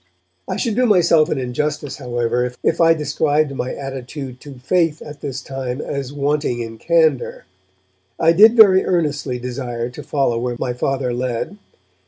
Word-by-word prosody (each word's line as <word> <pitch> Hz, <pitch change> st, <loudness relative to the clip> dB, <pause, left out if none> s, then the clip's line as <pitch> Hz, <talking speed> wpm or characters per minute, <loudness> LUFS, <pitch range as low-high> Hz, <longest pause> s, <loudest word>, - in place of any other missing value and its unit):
I -, -, -1 dB
should 230 Hz, -, -1 dB
do 250 Hz, +1 st, +3 dB
myself 170 Hz, -6 st, +4 dB
an -, -, -1 dB
injustice, 135 Hz, +3 st, -3 dB
however, 120 Hz, -1 st, -1 dB
if -, -, +1 dB
I 165 Hz, 0 st, +5 dB
described 150 Hz, -1 st, 0 dB
my 130 Hz, -1 st, -4 dB
attitude 135 Hz, -1 st, -7 dB
to 145 Hz, -2 st, -10 dB
faith 160 Hz, +4 st, +1 dB
at 150 Hz, -1 st, -11 dB
this 130 Hz, -2 st, -5 dB
time 135 Hz, -1 st, -5 dB
as 140 Hz, -3 st, -4 dB
wanting 145 Hz, -3 st, -1 dB
in 115 Hz, -1 st, -6 dB
candour. 160 Hz, -5 st, +1 dB, 0.7 s
I 165 Hz, 0 st, +5 dB
did 215 Hz, +7 st, +7 dB
very 190 Hz, -4 st, +7 dB
earnestly 145 Hz, -7 st, -1 dB
desire 120 Hz, -1 st, -4 dB
to 150 Hz, -, -9 dB
follow 135 Hz, -4 st, 0 dB
where 120 Hz, 0 st, -2 dB
my 125 Hz, 0 st, -2 dB
Father 130 Hz, 0 st, -1 dB
led. 125 Hz, -, -3 dB
140 Hz, 160 wpm, -19 LUFS, 125-155 Hz, 0.7 s, did